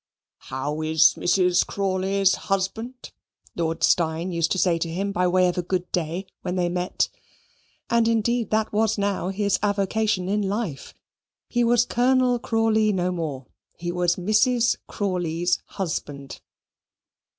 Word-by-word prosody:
"How 145 +4 -3
is 155 0 +4
Mrs. 180 0 +2
Crawley's 195 0 +1 0.2
husband?" 220 +6 -3 0.4
Lord 165 -1 -2
Steyne 165 +1 +2
used 170 -1 0
to - - -2
say 175 -2 +2
to 165 - -2
him 195 +4 -2
by 180 -2 +1
way 180 0 +3
of 180 0 -1
a - - +2
good 180 0 -3
day 175 +2 -2 0.2
when 180 - -3
they 175 -1 +1
met; 180 +1 -1 0.8
and 235 -1 +2
indeed 230 0 +1
that 215 0 0
was 220 +1 +1
now 200 -2 -1
his 200 +1 0
avocation 205 -1 0
in 205 +2 0
life. 200 -7 -3 0.5
He 240 0 +1
was 240 0 +3
Colonel 250 0 +2
Crawley 225 -2 +2
no 180 -2 0
more. 155 -7 -4 0.3
He 175 0 -3
was 175 0 +1
Mrs. 230 +5 +2
Crawley's 175 -3 -1
husband. 145 -8 -5
190 Hz, 140 wpm, -24 LUFS, 175-215 Hz, 0.8 s, is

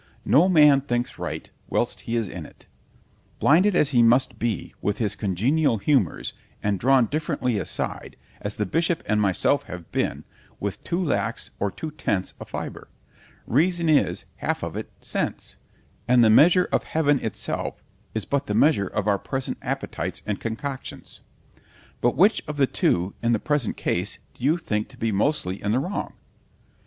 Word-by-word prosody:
No 165 +8 +5
man 150 -5 +6
thinks 120 -3 -2
right, - - -4 0.2
whilst - - 0
he 115 - 0
is 115 -3 0
in 90 -3 -7
it; - - -15 0.7
blinded 180 +7 +4
as 150 - +4
he 125 -4 +4
must 120 0 +3
be, 115 -6 -2
with 100 +1 0
his 105 -3 0
congenial 115 - +1
humours, 110 - +1 0.3
and 100 -2 0
drawn 130 +1 +4
differently 125 -5 -1
aside, - - -4 0.2
as 105 0 -4
the 105 - -1
bishop 165 - 0
and 105 -1 +1
myself 95 -4 +2
have 90 -2 -9
been, - - -1 0.4
with 100 -1 -4
too 175 +2 -1
lax 150 - -1
or 100 - +1
too 155 +10 -6
tense 100 -10 -2
a - - -6
fibre——REASON 170 +5 -3
is, 150 - +2
half - - -2
of - - -4
it, - - -5
SENSE; - - -4 0.5
and 125 -1 +5
the 110 - +6
measure 175 - +6
of - - +2
heaven 145 -3 +1
itself 110 - -4 0.3
is 110 - -1
but 140 0 -1
the 105 - -1
measure 115 -5 +4
of 105 +1 -2
our 100 -2 +3
present 130 +4 -4
appetites - - -4
and 105 -2 -2
concoctions.—— 130 +4 -6 0.8
——But 120 - +2
which 200 +7 +5
of 150 -1 -5
the 140 - +5
two, 90 -6 0
in 120 0 +2
the 110 - +2
present 145 -4 0
case, 90 +3 -1 0.2
do - - -14
you 150 +5 +3
think 105 -10 -2
to - - -16
be 115 0 0
mostly 100 -3 0
in 105 +1 0
the 125 - +3
wrong? 180 +8 -3
120 Hz, 170 wpm, -24 LUFS, 105-150 Hz, 0.8 s, man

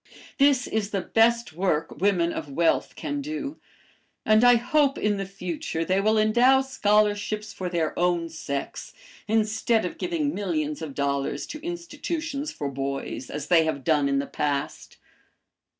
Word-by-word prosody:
"This 275 -3 +4
is 215 -2 -2
the 200 -3 -1
best 230 -1 +2
work 165 -3 -1
women 180 -4 +2
of 150 - -5
wealth 165 +4 +1
can 290 -1 -3
do, 305 0 -5 0.7
and 215 +1 +5
I 245 0 +8
hope 275 +4 +2
in 210 -1 0
the 195 -1 -4
future 175 -3 -4
they 190 +2 +2
will 215 +2 +2
endow 240 +5 +5
scholarships 210 -4 +1
for 185 -2 -4
their 165 -3 -1
own 175 -1 +1
sex 140 -4 -5 0.3
instead 220 0 +1
of 180 - -6
giving 320 -5 -1
millions 155 -6 -2
of 150 -4 -6
dollars 140 0 -1
to 305 - -8
institutions 330 -3 -4
for 145 - -4
boys, 135 -1 -4
as 150 -1 -5
they 170 -2 +6
have 150 -4 -2
done 150 -3 +2
in 140 - +1
the 140 - 0
past. 145 0 -3
200 Hz, 155 wpm, -25 LUFS, 160-245 Hz, 0.7 s, I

